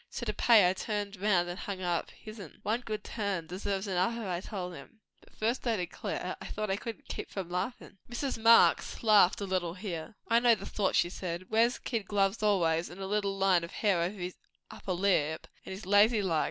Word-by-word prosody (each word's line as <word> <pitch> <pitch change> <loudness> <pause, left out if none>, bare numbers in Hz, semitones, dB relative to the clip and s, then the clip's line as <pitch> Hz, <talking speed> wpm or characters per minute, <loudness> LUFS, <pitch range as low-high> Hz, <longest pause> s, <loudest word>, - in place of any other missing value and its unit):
So - - -5
to - - -1
pay, 220 -6 +6
I 180 - +2
turned 205 0 -3
round 185 -4 +3
and 175 +2 -5
hung 200 -2 -5
up 175 -2 -1
his'n. 215 -6 -11
One 225 +4 0
good 215 -3 -5
turn 200 -6 -3
deserves 190 +3 -3
another, 200 +4 -1
I 175 -1 -2
told 180 -3 -5
him. 220 +5 -13 0.2
But - - -21
at - - -26
first, 235 +4 -1
I 230 - +2
declare, 180 -3 -4
I - - -7
thought 215 -2 -3
I - - +2
couldn't 225 +2 -7
keep - - -6
from 185 -3 -6
laughin'." 195 +3 -4
Mrs. 240 -1 -3
Marx 230 +1 +5
laughed 205 -4 +5
a - - -1
little 180 -3 -1
here. 185 -1 -6
"I 230 +2 +4
know 240 -1 +5
the - - -9
sort," 200 -3 -1
she 175 - +3
said. 180 -1 -5
"Wears 230 +2 +3
kid 225 -6 -3
gloves 200 +1 +1
always 175 -5 +2
and 175 - -11
a 195 - -4
little 200 0 -1
line 190 -3 +3
of 170 - -6
hair 200 -5 +1
over 180 +5 -2
his 180 0 -5 0.3
upper 185 - -4
lip, 175 -5 +1 0.2
and - - -6
is 190 +1 -7
lazy 205 +3 +4
like. 165 -5 +1
195 Hz, 220 wpm, -30 LUFS, 180-215 Hz, 0.3 s, pay